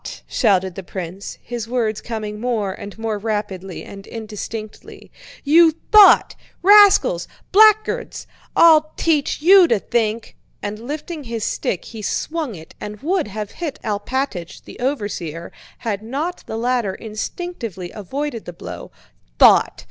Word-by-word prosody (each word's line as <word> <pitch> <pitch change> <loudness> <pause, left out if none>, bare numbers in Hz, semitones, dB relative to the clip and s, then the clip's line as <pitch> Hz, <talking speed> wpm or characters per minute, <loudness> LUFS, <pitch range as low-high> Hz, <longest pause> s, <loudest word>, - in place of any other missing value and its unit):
shouted 190 -5 +1
the 195 - -7
prince, 185 +1 -7
his 235 -2 -5
words 230 -3 -1
coming 215 -2 -5
more 220 -5 -1
and 200 +2 -10
more 225 -2 -3
rapidly 200 -4 -4
and 195 0 -11
indistinctly. 215 -1 -8 0.3
"You 320 +2 +6 0.2
thought!... 425 -2 +7 0.3
Rascals! 415 +5 +6 0.2
Blackguards!... 430 +1 +3 0.3
I'll 310 -2 +6
teach 300 -2 0
you 375 +1 +8
to 230 - +2
think!" 225 +1 -2 0.2
and 205 +1 -5
lifting 295 +5 -6
his 230 -2 -4
stick 185 - -2
he 225 -2 -9
swung 305 +3 -3
it 160 -1 -13
and 210 0 -7
would 345 - 0
have 210 0 -6
hit 315 -5 -5
Alpátych, 210 -3 -3
the - - -13
overseer, 205 - -3 0.3
had 210 -4 -3
not 285 +10 -4
the 220 - -4
latter 235 -4 0
instinctively 220 - -6
avoided 240 +4 -5
the 175 - -8
blow. - - -9 0.5
"Thought... - - +5
225 Hz, 135 wpm, -20 LUFS, 205-295 Hz, 0.5 s, you